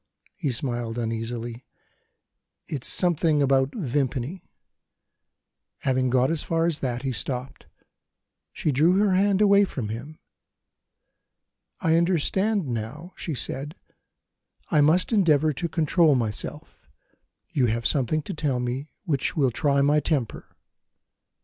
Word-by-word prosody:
He 145 - -3
smiled 120 -2 -3
uneasily: 115 +1 -4 1.0
"It's 140 -5 -3
something 165 -4 +2
about 135 0 +2
Vimpany." 140 - -2 1.3
Having 130 -1 +1
got 130 +3 +2
as 165 -3 -1
far 165 0 0
as 165 -3 +1
that, 125 -1 -3
he 135 - -1
stopped. 130 +1 -4 0.8
She 155 - -1
drew 155 +7 +3
her 200 0 +3
hand 200 +1 +2
away 200 0 +6
from 130 - -4
him. 130 +8 -7 1.6
"I 160 0 +3
understand 190 +4 +1
now," 125 +10 -5
she 160 - -4
said; 145 +5 -3 1.0
"I 150 - +4
must 165 +9 +3
endeavour 155 -7 +3
to 170 +5 -3
control 160 -1 +3
myself 110 -4 -3 0.7
you 130 -4 +2
have 115 +1 -2
something 145 +3 +1
to - - -6
tell 145 -5 -1
me 125 +4 -3 0.2
which 145 -4 -1
will 135 -4 +3
try 140 +3 +1
my 145 +2 +4
temper." 145 -7 -2
145 Hz, 125 wpm, -25 LUFS, 125-165 Hz, 1.6 s, away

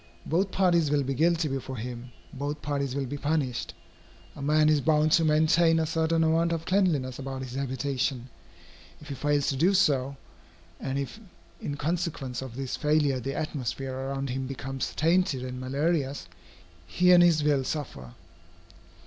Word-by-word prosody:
Both 185 +5 +1
parties 175 -5 +2
will 145 -1 +2
be 135 +1 -2
guilty 165 +3 +2
before 135 -1 -4
him, 120 +2 -7 0.2
both 145 +2 -4
parties 140 -2 -2
will 140 -1 -1
be 145 +3 -5
punished. 145 -4 -1 0.6
A - - -9
man 150 +2 +3
is 155 -2 +3
bound 155 +1 +3
to 165 - +5
maintain 160 +2 +4
a 160 - +1
certain 160 +1 +1
amount 165 +1 +2
of 165 0 -3
cleanliness 165 -10 +1
about 135 -1 -5
his 125 -1 -8
habitation. 130 -1 -2 0.7
If 150 - -13
he - - -3
fails 145 +1 0
to 135 - 0
do 175 +8 +3
so, 140 -6 +2 0.6
and 135 0 -3
if 140 +10 -4 0.4
in 145 - -4
consequence 150 -5 -2
of 130 -3 -8
this 135 -1 -3
failure 150 -3 +1
the 135 +3 -4
atmosphere 135 -3 -3
around 135 0 -3
him 130 +1 -3
becomes 135 0 -4
tainted 165 -5 +2
and 125 0 -6
malarious, 140 +2 -1 0.6
he 180 0 +3
and 175 -1 +8
his 165 -3 +4
will 145 -3 +2
suffer. 120 - -5
145 Hz, 165 wpm, -27 LUFS, 135-160 Hz, 0.7 s, and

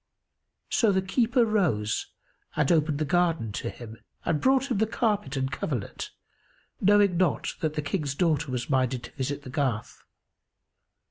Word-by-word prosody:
So 225 -3 +4
the 190 -1 +1
keeper 235 +5 +2
rose 155 - +1 0.5
and 150 0 +2
opened 155 -3 +2
the 155 - 0
garden 165 - +1
to - - -3
him, 115 -1 -10 0.3
and 155 -3 +1
brought 265 +1 +3
him 215 - +1
the 220 - +3
carpet 210 - 0
and 130 0 -1
coverlet, 135 -5 -4 0.7
knowing 200 -2 +4
not 180 -3 +1
that 155 -1 -1
the 150 - -1
King's 145 -3 -2
daughter 150 -3 +1
was 125 -1 -2
minded 130 -2 +1
to - - -9
visit 145 +1 -3
the 130 - -8
garth. 130 -7 -2
155 Hz, 155 wpm, -27 LUFS, 135-195 Hz, 0.7 s, So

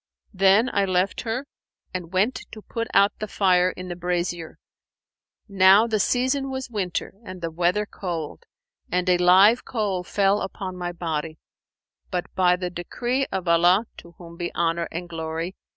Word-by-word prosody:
Then 195 +5 +4
I 200 -1 +2
left 185 0 0
her 245 +4 -3 0.5
and 180 -2 -5
went 200 +7 +1
to 215 -1 -10
put 230 0 -4
out 200 +1 +5
the 215 - -4
fire 185 -3 +3
in 180 0 -8
the 175 - -4
brasier.[FN#483] 175 -1 -3 0.9
Now 195 +1 +6
the 220 -2 0
season 260 +5 +1
was 260 -2 -5
winter 190 -5 -3
and 185 -3 -9
the 165 -1 -4
weather 180 +5 +1
cold, 170 -6 -6 0.5
and 180 +1 0
a 180 -1 +3
live 190 +6 +6
coal 205 -6 -2
fell 200 +2 +1 0.2
on 185 -2 -4
my 175 -1 -4
body: 160 -2 -4 0.7
but 180 -1 -2
by 180 -1 +3
the 180 0 -4
decree 240 +10 -2
of 185 -2 -3
Allah 175 +5 +4
(to 170 - -13
whom 170 -1 -12
be 175 0 -3
Honour 170 0 0
and 175 +1 -5
Glory!) 165 +2 -4
185 Hz, 165 wpm, -24 LUFS, 175-205 Hz, 0.9 s, Now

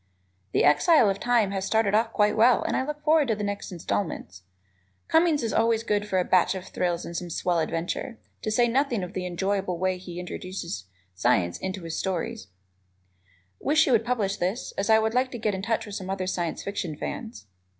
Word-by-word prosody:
"The - - +3
Exile 215 - +5
of 195 - -4
Time" 235 -5 +2
has 195 -1 -2
started 220 -1 +1
off 220 +2 +2
quite 210 -1 +2
well 235 +2 +5
and - - -1
I - - +1
look 300 +2 -5
forward 305 -2 +4
to 225 - +1
the 210 - -4
next 205 -1 -4
installments. 165 - -3 0.7
Cummings 320 -4 +3
is 225 - -1
always 225 0 +2
good 210 -2 0
for 190 - 0
a 180 - +2
batch 185 +1 +3
of 185 -1 -6
thrills 175 -1 -1
and 170 - -7
some 175 +1 -4
swell 170 +1 0
adventure, 165 +9 -3 0.2
to - - -2
say 240 +2 +3
nothing 245 -4 +1
of 180 - -6
the 180 -1 -3
enjoyable 190 0 -1
way 185 +1 0
he 180 -1 -8
introduces 180 - -6 0.3
science 90 -1 +1
into 190 0 -4
the 165 -1 -6
story. 190 +6 -2 1.2
Wish 310 +2 +3
you - - +1
would 230 -2 +4
publish 215 -5 -1
this, 190 +8 -2
as 200 - -2
I 220 - +7
would 220 0 +1
like 255 +1 +2
to - - -3
get 215 -2 -1
in 190 - -3
touch 225 +3 -1
with 205 - -9
some 190 -2 -5
other 190 -1 -2
Science 175 -3 -2
Fiction 180 -6 -4
fans. 230 +7 -6
200 Hz, 210 wpm, -26 LUFS, 180-230 Hz, 1.2 s, I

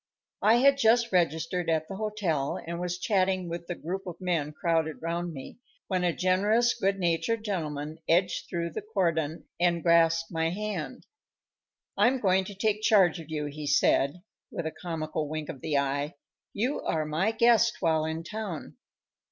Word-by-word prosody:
_"] - - +3
I 225 - +7
had 275 +3 +4
just 235 -1 +4
registered 170 0 0
at 160 -1 +1
the 195 - -6
hotel, 195 -10 -1
and 170 +1 -4
was 180 0 -2
chatting 185 -1 +1
with 170 0 -6
the 175 - -3
group 190 +4 -5
of 175 - -7
men 170 -5 -1
crowded 160 -1 0
round 170 +1 -3
me, 135 - -9 0.3
when 185 -2 0
a 175 - +3
generous, 205 +7 +2
good 195 -3 0
natured 190 +5 0
gentleman 155 -5 -3
edged 180 +2 +2
through 170 -1 -2
the - - -4
cordon 170 -7 -1
and 175 -1 +2
grasped 165 -1 +3
my 165 -1 0
hand. 210 +3 -4 0.9
"I'm 260 +2 +3
going 190 -3 +2
to 200 - -8
take 210 +1 0
charge 195 -6 +4
of 160 -1 -10
you," 150 -1 -2
he 145 +1 -6
said, 145 +3 +2 0.3
with 170 - -5
a 160 - -2
comical 155 -3 -4
wink 155 -1 -4
of 130 - -7
the 150 -2 0
eye; 140 +3 -1 0.4
"you 245 +8 -1
are 155 -1 -1
my 160 +7 0
guest 235 0 +4
while 160 -3 +2
in 160 +1 -3
town." 210 -4 -6
175 Hz, 175 wpm, -28 LUFS, 160-200 Hz, 0.9 s, I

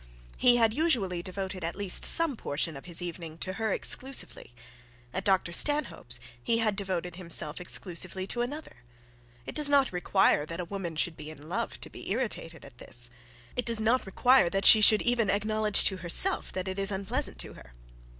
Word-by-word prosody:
He 245 -1 +4
had 225 -2 +2
usually 225 - 0
devoted 190 0 -6
at 165 +1 -4
least 200 -2 +2
some 330 -5 +5
portion 155 -4 -3
of 140 - -11
his 175 0 -1
evening 165 -2 -7
to 185 +2 -5
her 220 -2 -1
exclusively. 265 - -2 0.6
At 190 - -3
Dr 190 -3 0
Stanhope's 295 - +1 0.2
he 230 -1 0
had 220 -3 0
devoted 180 -3 -5
himself 170 -3 -1
exclusively 185 +1 -1
to 240 +5 -4
another. 290 - -7 0.7
It - - -8
does 300 -1 +4
not 280 -6 +2
require 180 -3 +1
that 165 +2 -7
a 180 - -4
woman 175 -3 -6
should 165 +1 -1
be 150 0 -9
in 155 -1 -12
love 225 +7 -4
to - - -6
be - - -10
irritated 195 - -4
at 130 -3 -17
this; 120 0 +1 0.4
it 250 - -1
does 230 -2 +2
not 225 +1 0
require 250 0 +3
that 195 +2 -2
she 215 - +8
should 215 0 +6
even 240 -3 0
acknowledge 215 0 +2
to 190 - +2
herself 185 - +2
that 185 0 -4
it 190 +1 -5
was 195 +1 +1
unpleasant 220 +9 +2
to - - -8
her. - - -16
195 Hz, 190 wpm, -27 LUFS, 175-230 Hz, 0.7 s, she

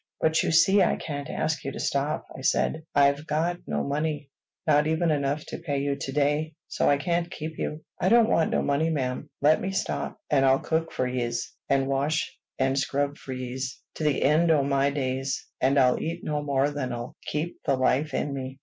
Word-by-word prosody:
"But 160 0 +3
you - - 0
see 190 +5 +5
I 180 - +3
can't 145 -1 -5
ask 155 -1 -1
you 135 - -3
to - - -6
stop," 140 +2 -1
I - - -8
said. 155 +3 +1
"I've 140 +2 +3
got 165 +4 0
no 75 -1 -1
money, 145 -1 -2 0.3
not 150 -2 +4
even 160 +1 +1
enough 145 0 0
to - - -5
pay 150 -4 -2
you 140 0 0
to 135 - -5
day; 150 +2 0
so - - +1
I 145 - +4
can't 170 +3 -1
keep 160 -2 -6
you." 155 +1 -3 0.2
"I 185 - +2
don't 230 0 +6
want 165 -7 +2
no - - +1
money, 145 +3 +1
ma'am. 140 -1 -2
Let 155 +2 +5
me 195 - -2
stop, 195 0 -2
and 135 -2 +4
I'll 135 0 +5
cook 160 +3 -1
for 130 - -1
yez, 120 -2 -2 0.2
and 135 -1 +3
wash 140 +4 0 0.2
and 135 +1 +1
scrub 140 +1 -1
for 130 - -8
yez, 130 0 -4 0.2
to - - -5
the 150 -3 +2
end 155 +4 +4
o' 150 -3 +4
my 140 0 +2
days. 135 -1 -2 0.2
An' 135 +2 +3
I'll 125 -2 +4
eat 170 +2 -4
no 150 -1 -1
more 140 0 +1
than'll 125 -4 -4
keep 155 +4 -3
the 135 - +3
life 130 +3 +1
in 145 - -1
me. 135 0 -6
145 Hz, 210 wpm, -26 LUFS, 135-155 Hz, 0.3 s, don't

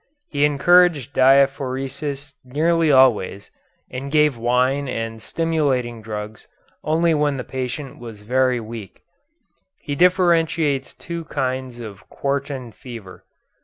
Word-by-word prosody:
He 145 0 +2
encouraged 150 -2 +4
diaphoresis 135 +1 +1
nearly 160 +5 +1
always, 115 -7 +3 0.4
and 135 +2 -6
gave 150 -2 +3
wine 125 +4 +1
and 115 -2 -4
stimulating 140 -9 -1
drugs 105 0 -7 0.4
only 165 +2 +2
when 145 -2 +1
the 125 - -4
patient 130 +2 -5
was 115 -3 -10
very 130 +2 +1
weak. 110 -3 -9 0.8
He 145 - -6
differentiates 165 -4 +2
two 170 -1 -6
kinds 130 -3 -3
of 105 -5 -10
quartan 140 -3 -3
fever. 115 -6 -11
135 Hz, 110 wpm, -21 LUFS, 120-150 Hz, 0.8 s, encouraged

